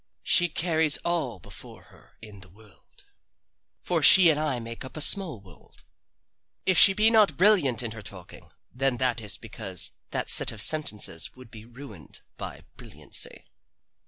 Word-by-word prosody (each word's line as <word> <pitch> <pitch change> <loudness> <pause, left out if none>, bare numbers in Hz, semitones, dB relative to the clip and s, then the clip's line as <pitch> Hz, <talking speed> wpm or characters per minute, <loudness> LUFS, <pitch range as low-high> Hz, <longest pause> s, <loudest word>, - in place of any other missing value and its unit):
She 175 0 +3
carries 160 -2 -1
all 160 - -4
before - - -14
her - - -24
in 105 -2 -13
the 95 -1 -14
world. 105 +2 -23 0.8
For - - -2
she 180 -4 +7
and 150 - -3
I 150 -5 -3
make 115 0 -10
up 130 +4 -12
a - - -6
small 165 - +2
world. 95 -4 -21 0.8
If 185 - +1
she 195 - +8
be 215 +3 +2
not 210 -9 +1
brilliant 175 - +2
in 115 - -6
her 110 0 -10
talking, 95 -3 -12 0.2
then 135 0 -2
that 125 -2 -1
is 105 -3 -4
because 100 -5 -1 0.2
that - - -4
set - - +5
of 110 - -11
sentences 105 - 0
would 130 -2 -17
be 110 -1 -14
ruined 115 - -13
by - - -10 0.2
brilliancy. - - -6
125 Hz, 160 wpm, -24 LUFS, 105-160 Hz, 0.8 s, she